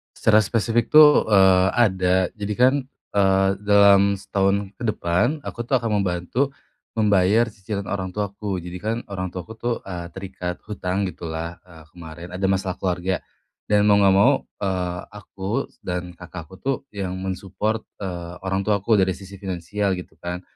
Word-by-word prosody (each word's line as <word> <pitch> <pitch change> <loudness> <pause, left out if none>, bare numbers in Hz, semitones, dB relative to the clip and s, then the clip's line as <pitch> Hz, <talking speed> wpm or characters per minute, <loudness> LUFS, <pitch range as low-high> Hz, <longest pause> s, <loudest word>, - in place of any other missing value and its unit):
Secara 110 0 +4
spesifik 115 +3 +1
tuh, 150 -4 +8
eee, 95 -3 +5
ada, 95 -6 +3 0.2
jadi 105 0 -3
kan, 125 +2 +5 0.4
eee, 95 -1 +3
dalam 100 -1 +5
setahun 100 +1 0
ke 120 - -8
depan, 115 - 0
aku 120 0 -5
tuh 135 - +2
akan 110 -3 0
membantu 95 +10 -1 0.4
membayar 105 +1 +4
cicilan 100 -1 -5
orang 95 -2 -3
tuaku. 100 0 -3
Jadi 90 +1 -6
kan 110 +2 -1
orang 95 -1 -3
tuaku 90 +4 -7
tuh, 120 +1 -1
eee, 90 -3 -6
terikat 95 -2 -6
hutang 100 -1 -2
gitulah, 80 +1 -6
eee, 80 -3 -15
kemarin 85 0 -10
ada 95 +1 -1
masalah 95 -1 0
keluarga 90 0 -1 0.5
dan 105 0 +3
mau 105 -1 +5
nggak 95 -1 +5
mau, 100 - +6 0.3
eee, 90 -2 -1
aku 100 -1 -4 0.2
dan 90 0 -4
kakakku 90 0 -10
tuh 135 +5 -1 0.2
yang 95 -2 -3
men-support, 95 +4 -3 0.2
eee, 90 -2 -5
orang 95 +1 -1
tuaku 105 +1 +2
dari 95 -1 +3
sisi 100 +2 -11
finansial 95 +1 -2
gitu 90 -3 -7
kan. 90 +1 -5
95 Hz, 155 wpm, -23 LUFS, 90-105 Hz, 0.5 s, tuh